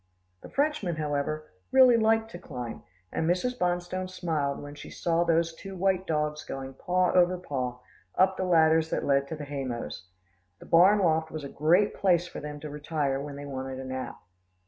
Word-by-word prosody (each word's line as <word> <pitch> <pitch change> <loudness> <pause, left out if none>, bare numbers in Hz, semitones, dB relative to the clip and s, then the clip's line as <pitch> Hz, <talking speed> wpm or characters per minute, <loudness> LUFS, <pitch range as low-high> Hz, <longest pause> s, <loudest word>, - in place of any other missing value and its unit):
The - - -11
Frenchmen, 280 - 0
however, 155 0 -2 0.2
really 260 -2 +7
liked 225 0 +2
to 175 - -8
climb, 125 -8 -7 0.3
and 160 - -1
Mrs. 185 +8 +1
Bonstone 180 +1 -1
smiled 160 -6 -2
when 145 0 -8
she 145 - -10
saw 170 0 0
those 165 0 +2
two 195 +3 -9
white 190 0 +1
dogs 150 -1 -1
going, 135 0 -6
paw 180 +5 +1
over 180 0 +4
paw, 130 -8 -3 0.4
up 190 0 +4
the 185 - -2
ladders 160 -2 +4
that - - -1
led 140 0 +2
to 160 - -5
the 150 -1 -7
hay 140 -1 -4
mows. 115 - -5 0.5
The - - -14
barn 185 +5 +6
loft 160 -4 +2
was 155 -2 -6
a 140 - -6
great 175 +9 +3
place 180 -3 +2
for - - -8
them 150 0 -7
to 150 - -6
retire 145 -2 -1
to - - -5
when 145 -1 -7
they 145 0 -7
wanted 130 -1 -5
a 130 - -6
nap. 130 0 -5
160 Hz, 195 wpm, -28 LUFS, 145-180 Hz, 0.5 s, really